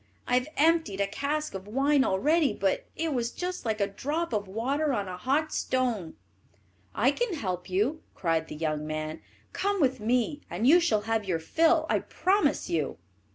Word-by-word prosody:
I - - -1
have 250 +2 +3
emptied 320 -10 +3
a 200 - +3
cask 295 +9 -2
of 195 0 -7
wine 275 +5 +3
already, 295 - +2
but - - -1
it 325 -2 -1
was 235 -2 0
just 360 +3 -5
like 220 -1 0
a 200 - +3
drop 290 +10 -3
of 205 -2 -1
water 270 +9 0
on 205 -5 -1
a 185 - -5
hot 280 - 0
stone." 240 -10 -1 0.8
"I 250 +6 +4
can 445 +3 -1
help 185 - -4
you," 215 +12 0
cried 165 -2 0
the - - -7
young 155 -1 -2
man; 155 0 -4 0.3
"come 400 0 0
with 265 -5 +2
me, 245 +6 0
and 210 +6 -2
you 320 +7 +7
shall 225 -12 +2
have 220 0 -1
your 180 -4 0
fill, 320 - +2
I - - +2
promise 370 -6 +1
you." 155 - -1
250 Hz, 185 wpm, -28 LUFS, 195-310 Hz, 0.8 s, you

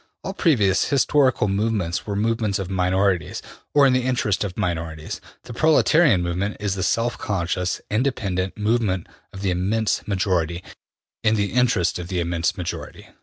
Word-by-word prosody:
All 190 - -4
previous 110 - +2
historical 140 -4 +2
movements 100 -3 -1
were 100 - -2
movements 110 -1 0
of 95 -2 -5
minorities, 95 0 +1 0.4
or 145 -1 +7
in 130 - +4
the 130 - +2
interest 120 -6 0
of 95 -3 -5
minorities. 80 -3 -3 0.2
The 120 - -9
proletarian 155 - +4
movement 90 +4 -2
is 100 -2 -1
the 95 - -3
self 115 +4 0
conscious, 90 -2 -2
independent 100 -6 -1
movement 105 -4 0 0.3
of 100 0 -8
the 95 - +1
immense 100 +5 0
majority, 90 -4 0 0.6
in 110 0 +3
the 100 -2 -1
interest 115 -10 +2
of 85 - -6
the 90 -1 -2
immense 85 0 -1
majority. 90 -2 -6
100 Hz, 155 wpm, -23 LUFS, 90-115 Hz, 0.6 s, or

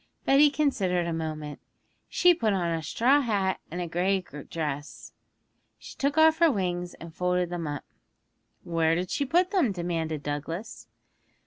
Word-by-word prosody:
Betty 285 +2 +6
considered 195 - 0
a 170 - -2
moment 155 -2 -5 0.5
'She 355 0 +5
put 225 -10 0
on 175 -3 0
a 165 -1 -1
straw 250 - +3
hat 200 -6 0
and 175 - -5
a 175 - -3
grey 185 +4 +1
dress; 145 -2 -6 0.6
she - - -12
took 285 +2 -1
off 320 0 +5
her 335 -2 +5
wings 180 -4 -2
and 165 -1 -11
folded 180 0 0
them 170 -3 -3
up.' 145 -1 -5 0.8
'Where 165 -1 +1
did 180 +1 -3
she 285 - 0
put 355 +7 +2
them?' 345 - +2
demanded 165 -4 -3
Douglas. 160 +8 -5
180 Hz, 155 wpm, -27 LUFS, 165-255 Hz, 0.8 s, Betty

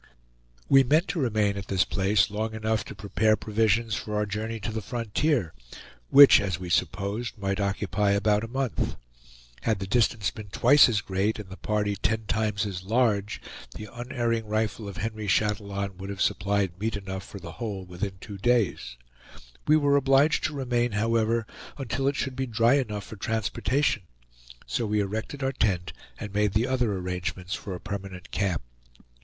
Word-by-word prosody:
We 135 - +7
meant 155 +8 +3
to 170 0 -2
remain 105 -6 +1
at 100 +1 -6
this 95 -1 +2
place 100 0 +2
long 110 +1 -3
enough 110 -1 0
to - - -9
prepare 110 +2 +2
provisions 110 +1 +1
for 105 +1 -3
our 105 0 +1
journey 110 +2 -4
to 110 - -3
the 110 0 -3
frontier, 115 - -1 0.6
which 140 -5 +9
as 95 -4 -1
we 90 -1 -6
supposed 100 +8 -1
might 100 0 -2
occupy 100 0 0
about 105 +1 +2
a - - -4
month. 130 0 -2 0.7
Had 110 -2 +1
the 95 - -4
distance 110 -1 +1
been 105 -3 -9
twice 125 +8 +6
as 105 -3 +1
great 100 +3 -1
and 105 -3 -8
the - - -6
party 105 0 -1
ten 110 +3 -1
times 105 -1 0
as 95 -3 -5
large, 105 -1 +1 0.3
the 105 - -7
unerring 120 -2 -2
rifle 110 0 -1
of 100 - -9
Henry 110 +2 -4
Chatillon 100 -1 0
would 95 +1 -7
have 100 -1 -6
supplied 95 -2 0
meat 110 0 -1
enough 95 -1 -6
for - - -10
the 85 -2 -8
whole 100 -2 -5
within 95 +2 -5
two 100 +1 -9
days; 100 - +1 0.7
we 155 +1 +6
were 145 -2 +3
obliged 140 +2 +3
to 155 -2 -2
remain, 120 -3 0
however, 115 +1 +1 0.3
until 135 0 -2
it 140 - +1
should 130 -2 -2
be 130 0 -2
dry 115 +1 +3
enough 110 -7 0
for 110 - -10
transportation; 115 +4 0 0.6
so 115 - -1
we 105 0 +1
erected 110 +8 -3
our 135 - +1
tent 95 -8 0 0.3
and 105 -2 -6
made 105 -1 +1
the 110 +3 +2
other 125 -4 +1
arrangements 90 0 -4
for 95 - -5
a - - -7
permanent 100 -3 -7
camp. 95 -8 -1
105 Hz, 175 wpm, -27 LUFS, 100-115 Hz, 0.7 s, which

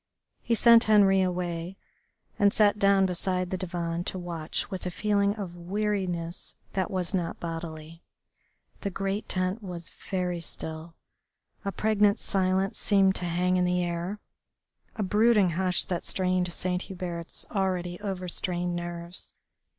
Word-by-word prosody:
He 235 - +1
sent 230 0 +7
Henri 195 -3 +6
away 180 0 -2 0.6
and 200 0 +5
sat 210 -1 +3
down 195 -1 +5
beside 180 0 -1
the - - 0
divan 170 -2 -3
to - - -2
watch 170 0 -3
with 190 -1 -4
a - - 0
feeling 200 +2 +1
of 190 -5 -6
weariness 180 -2 -2 0.2
that 190 -3 0
was 185 0 -1
not 175 -3 -1
bodily. 165 -1 -6 0.8
The 200 - -2
great 195 +2 -3
tent 185 +4 0
was 175 -4 -5 0.2
very 180 -3 -1
still, 160 0 -7 0.7
a 200 - -1
pregnant 210 -1 +3
silence 190 0 0
seemed 195 -2 +4
to 180 - -4
hang 180 +2 +1
in 180 - +3
the 180 0 +1
air, 175 +4 -3 0.8
a 215 - -1
brooding 210 -1 +4
hush 180 +1 +1
that 175 -2 -2
strained 185 -1 0
Saint 180 +1 -1
Hubert's 175 -3 -2
already 180 -3 -1
overstrained 180 -2 -2
nerves. 175 0 -5
185 Hz, 140 wpm, -28 LUFS, 175-195 Hz, 0.8 s, sent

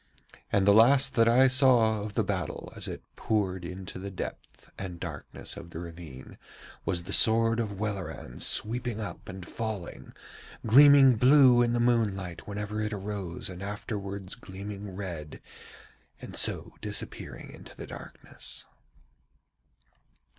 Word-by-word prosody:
And 100 -1 +2
the 100 - +6
last 135 +5 +5
that 115 0 +4
I 130 +3 +6
saw 125 -5 +4
of 105 0 -6
the 110 - +2
battle 95 -4 -4
as - - -5
it - - -7
poured 95 -4 -1
into 90 +1 -7
the 100 +1 -6
depth 95 - -8
and 90 -3 -7
darkness 80 -5 -6
of 85 - -10
the 85 - -9
ravine 80 -6 -10 0.5
was 90 -3 -1
the - - -3
sword 115 +1 +4
of 100 -4 -3
Welleran 100 -3 -5
sweeping 120 0 +1
up 100 -4 -7
and 95 -2 -8
falling, 110 -6 -6 0.5
gleaming 135 +1 +7
blue 130 0 +6
in 120 -1 +2
the 120 - +1
moonlight 105 -7 0
whenever 105 +1 -4
it 105 0 -2
arose 100 -3 -4
and 90 0 -8
afterwards 100 -1 -5
gleaming 100 0 -8
red, 85 -6 -7 0.8
and - - -9
so - - +3
disappearing - - -6
into - - -13
the - - -8
darkness. - - -9
105 Hz, 140 wpm, -28 LUFS, 95-115 Hz, 0.8 s, gleaming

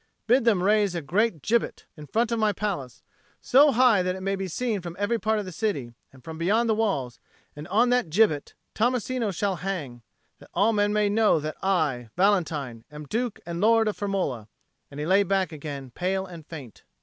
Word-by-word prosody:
Bid 245 +2 +3
them 205 -6 +3
raise 205 -2 +2
a 170 - -2
great 180 - 0
gibbet 235 +1 0
in 150 -2 -11
front 230 +6 0
of 230 - 0
my 215 -1 +3
palace, 180 - -4 0.4
so 285 +3 +5
high 245 -5 +4
that 180 0 -1
it 190 0 -7
shall 195 - +1
be 195 0 -4
seen 215 +2 -2
from 170 -1 -7
every 205 +4 0
part 220 0 +1
of 210 - -3
the 185 - -7
city 155 - -3 0.2
and 130 -2 -18
from 160 +2 -8
beyond 215 +8 +2
the 220 - +3
walls; 165 - -1 0.4
and 150 +2 -8
on 235 +6 +3
that 245 -9 +1
gibbet 155 -5 +2 0.2
Tommasino 245 0 0
shall 195 +1 -1
hang, 160 -11 -5 0.4
that - - -16
all 220 +3 +3
men 205 -1 +2
may 210 0 +2
know 210 -4 +3
that 155 +1 -5
I, 155 -11 0
Valentine, 155 - 0
am 150 0 -9
Duke 230 - -3
and 170 +1 -4
Lord 225 +1 +4
of 215 - -1
Firmola." 185 - -2 0.4
And 145 - -9
he 150 - -2
lay 190 +4 +4
back 195 -2 0
again, 140 -4 -7
pale 190 +5 -2
and 170 -4 -11
faint. 140 -9 -10
195 Hz, 205 wpm, -26 LUFS, 155-220 Hz, 0.4 s, so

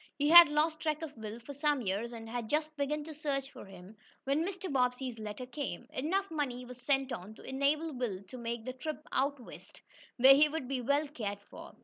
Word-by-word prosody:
He 290 +1 +2
had 345 0 +11
lost 310 +1 +1
track 310 0 -1
of 300 -2 -6
Will 220 0 -7
for 285 +5 -8
some 285 -2 +1
years 205 +4 -2
and 225 -1 -8
had 230 -1 -4
just 310 +1 0
begun 295 +1 -2
a 315 - -7
search 280 -2 -3
for - - -11
him, 190 +1 -13 0.3
when 280 +4 +1
Mr. 370 -3 -4
Bobbsey's 250 -2 0
letter 215 +3 -6
came. 265 -1 -5
Enough 375 +8 -1
money 255 -5 -2
was 250 0 -11
sent 270 -1 +1
on 215 -1 -6
to - - -14
enable 290 +4 0
Will 225 -7 -3
to 195 +7 -11
make 235 -1 -4
the 255 - -4
trip 305 +4 -6
out 280 +1 0
west, 245 - -13 0.4
where 265 +2 +9
he 300 +2 +5
would 295 -4 -4
be 265 -1 -2
well 285 +5 +1
cared 205 -8 -5
for. - - -11
270 Hz, 220 wpm, -32 LUFS, 240-300 Hz, 0.4 s, had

